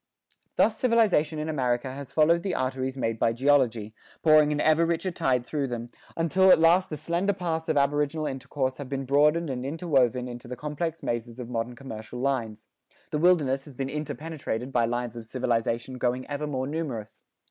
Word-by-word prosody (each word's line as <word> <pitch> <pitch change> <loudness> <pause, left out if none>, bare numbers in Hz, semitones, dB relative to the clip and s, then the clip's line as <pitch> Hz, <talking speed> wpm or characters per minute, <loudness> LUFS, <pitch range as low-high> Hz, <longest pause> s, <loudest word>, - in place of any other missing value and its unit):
Thus - - +2
civilization 215 - +3
in 150 +1 -3
America 130 -4 -1
has 135 -1 -8
followed 165 +2 +4
the 190 - -2
arteries 130 +1 -2
made 115 -3 -2
by 115 - +2
geology, 120 -5 +2 0.3
pouring 155 -1 +6
an 150 - -1
ever 155 +2 +4
richer 170 +2 0
tide 125 -7 0
through 145 +1 -2
them, 120 -1 -5 0.3
until 185 +3 +3
at - - +8
last 170 +3 +4
the 155 - -4
slender 170 +6 0
paths 165 -3 -3
of 155 - +2
aboriginal 145 +2 +1
intercourse 130 -1 -3
have 140 -3 -7
been 135 -1 -3
broadened 150 +3 +3
and 125 -1 -4
interwoven 135 -5 +1
into 120 -1 -8
the 125 - -5
complex 150 +4 -4
mazes 120 +1 -3
of 120 -1 -6
modern 115 +1 -3
commercial 115 -3 -8
lines; 120 -5 -2 0.5
the 150 - 0
wilderness 150 -6 +3
has 145 -4 -13
been 135 +1 -3
interpenetrated 150 -4 -4
by 120 -3 +2
lines 120 0 -3
of 115 -2 -8
civilization 120 0 -1
growing 125 +1 0
ever 145 +1 -4
more 130 -3 -2
numerous. 135 -8 -5
135 Hz, 180 wpm, -27 LUFS, 125-155 Hz, 0.5 s, at